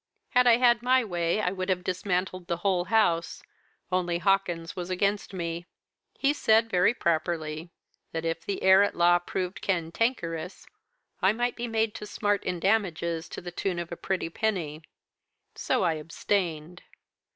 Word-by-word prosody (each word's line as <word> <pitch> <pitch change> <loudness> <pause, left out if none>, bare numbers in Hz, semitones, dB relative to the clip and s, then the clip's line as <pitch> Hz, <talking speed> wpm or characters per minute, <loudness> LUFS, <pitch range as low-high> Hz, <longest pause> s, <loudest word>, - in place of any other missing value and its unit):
Had 250 0 +4
I 235 -1 +7
had 240 -1 +4
my 255 +1 +3
way 175 -1 0
I 180 - 0
would 185 0 -4
have 180 -1 0
dismantled 185 -1 -2
the 170 - -1
whole 180 -3 +2
house 185 -6 +1 0.5
only 175 -2 +1
Hawkins 175 -3 0
was 180 -1 -5
against 200 +3 0
me. 170 -2 -4 0.5
He 280 +1 +2
said 225 -5 +3
very 185 +6 +3
properly, 160 -2 -1 0.4
that 165 0 -4
if 165 0 -2
the 200 - -4
heir 190 +1 +7
at 205 - +1
law 175 0 +5
proved 180 +1 -4
cantankerous, 170 -1 -2 0.6
I 190 +2 +4
might 240 +2 -1
be 240 0 -4
made 225 -1 0
to 210 - -7
smart 205 -1 0
in 180 - -2
damages 170 -4 0
to - - -7
the 175 0 -7
tune 180 +1 -2
of 170 0 -5
a - - -3
pretty 180 -2 -3
penny. 170 -8 -2 0.7
So - - 0
I 165 - +2
abstained. 165 +1 -2
180 Hz, 160 wpm, -27 LUFS, 170-205 Hz, 0.7 s, I